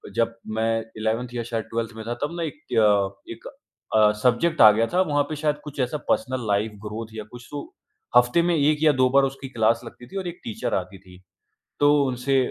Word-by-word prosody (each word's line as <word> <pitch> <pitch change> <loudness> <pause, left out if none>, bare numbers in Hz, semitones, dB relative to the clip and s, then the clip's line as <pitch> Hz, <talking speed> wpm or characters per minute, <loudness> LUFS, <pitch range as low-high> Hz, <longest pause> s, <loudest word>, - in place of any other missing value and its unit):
जब 115 0 +1 0.2
मैं 115 0 +1 0.2
11th 110 +3 -1
या 120 -1 -3
शायद 115 -1 -3
12th 115 0 -2
में 110 - -7
था 120 - -1
तब 170 +4 -3
ना 170 - -2
एक 295 - -6
त्य 100 -2 +2
एक 115 - -12 0.5
अ, 105 -1 +6
सब्जेक्ट 155 +7 +2
आ 110 -1 +10
गया 115 +2 +1
था। 185 - +4
वहाँ 145 -5 +1
पे 155 - -3
शायद 150 0 0
कुछ 150 -1 -9
ऐसा 130 +3 0
पर्सनल 130 -3 0
लाइफ़ 105 +2 +1
ग्रोथ 110 +1 -5
या 110 - -6
कुछ 120 0 -11
तो 145 - -4 0.6
हफ्ते 125 +7 +4
में 175 0 +1
1 150 0 +3
या 155 - +6
2 130 - +5
बार 140 +1 +4
उसकी 135 0 -3
क्लास 115 -2 +2
लगती 120 +1 -12
थी 195 - -7
और 185 -2 -3
एक 175 +1 -7
टीचर 110 - -4
आती 95 +1 -4
थी। 95 -1 -17 0.6
तो 145 0 +5
उनसे 130 +1 0
120 Hz, 220 wpm, -24 LUFS, 110-145 Hz, 0.6 s, आ